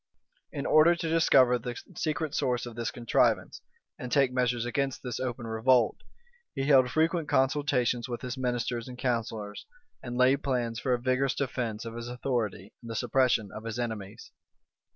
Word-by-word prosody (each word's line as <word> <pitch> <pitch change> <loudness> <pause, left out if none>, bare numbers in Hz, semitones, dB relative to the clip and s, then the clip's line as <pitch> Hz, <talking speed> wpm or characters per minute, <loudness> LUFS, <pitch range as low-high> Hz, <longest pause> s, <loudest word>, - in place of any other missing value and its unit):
In 140 -3 -4
order 160 +3 +6
to 165 -1 -3
dis 165 0 +2
cover 125 -2 +5
the 120 +1 -6 0.2
secret 155 -1 -2
source 125 -5 0
of 120 -2 -8
the 115 -1 -2
contrivance, 120 -2 +1 0.4
and 125 - -6
take 135 -3 +3
measures 125 -2 0
against 135 +2 -2
this 125 -2 -4
open 120 -2 -4
revolt, 115 +2 +2 0.6
he 135 - -1
held 135 -3 +5
frequent 160 +1 +1
consultations 130 -3 +1
with 120 - -4
his 125 -1 -4
ministers 120 -2 -2
and 125 -1 -9
counsellors, 115 -4 -3 0.3
and 125 -1 -5
laid 130 +3 +4
plans 120 -4 -1
for 125 -1 +1
a - - -5
vigorous 130 +2 +1
defence 120 -5 -3
of 115 - -6
his 120 0 -6
authority, 120 -6 -3
and 115 - -10
the 115 - -4
suppression 120 -4 +1
of 110 - -8
his 115 0 -5
enemies. 110 -5 -5
125 Hz, 175 wpm, -28 LUFS, 115-135 Hz, 0.6 s, order